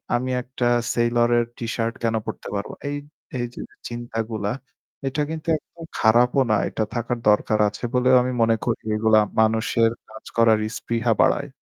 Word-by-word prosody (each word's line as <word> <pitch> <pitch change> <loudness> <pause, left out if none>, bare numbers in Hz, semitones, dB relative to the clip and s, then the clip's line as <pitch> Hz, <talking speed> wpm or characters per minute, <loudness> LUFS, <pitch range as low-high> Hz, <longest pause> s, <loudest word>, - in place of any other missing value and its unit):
আমি 130 +2 -1
একটা 125 -1 -2 0.3
Sailor 120 0 +2
এর 120 - +2
টি-শার্ট 115 0 -2
কেন 115 -1 +1
পড়তে - - -6
পারবো 100 0 -3
না? - - -34
এই 145 - -2 0.4
এই 120 - 0
যে - - -8 0.3
চিন্তাগুলা 115 -3 -3 0.6
এটা 150 +3 -1
কিন্তু 160 0 -6
একদম 165 +2 -15 0.2
খারাপও 120 +4 +4
না 105 - +4
এটা 110 - -1
থাকার 120 +1 -2
দরকার 105 +1 +2
আছে 105 - -12
বলেও 125 +1 +4
আমি 130 - -1
মনে 115 0 +4
করি। 120 - -1
এগুলা 110 0 +4 0.2
মানুষের 110 +1 +2 0.2
কাজ 110 0 -12
করার 110 -2 +5
ইস্পৃহা 115 0 -1
বাড়ায়। 140 - +2
115 Hz, 165 wpm, -23 LUFS, 110-125 Hz, 0.6 s, করার